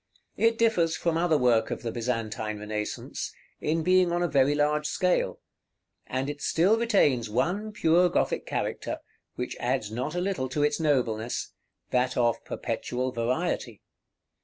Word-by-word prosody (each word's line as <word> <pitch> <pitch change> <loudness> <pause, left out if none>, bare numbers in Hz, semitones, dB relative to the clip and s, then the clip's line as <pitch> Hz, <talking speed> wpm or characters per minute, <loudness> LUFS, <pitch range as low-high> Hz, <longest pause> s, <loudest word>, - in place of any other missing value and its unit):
It 230 0 +3
differs 180 -9 +2
from 170 -2 0
other 165 -2 +3
work 120 -4 +3
of - - -4
the 115 - -2
Byzantine 110 -3 -2
Renaissance, 105 0 -4 0.3
in 160 +2 0
being 185 0 +4
on 175 +1 +1
a - - +2
very 140 -1 +3
large 150 0 +1
scale; 180 +2 0 0.7
and 130 +1 -2
it 145 0 -5
still 185 +7 +3
retains 145 - +2
one 180 - 0
pure 180 -3 +3
Gothic - - 0
character, - - -2 0.4
which 125 - -4
adds 120 -4 -1
not 130 +8 -3
a - - 0
little 180 -8 -1
to 145 +3 0
its 150 +1 +1
nobleness, 125 -7 0 0.4
that 125 0 +1
of 120 -1 +2
perpetual 125 +1 -3
variety. 120 - -2
145 Hz, 150 wpm, -27 LUFS, 120-175 Hz, 0.7 s, being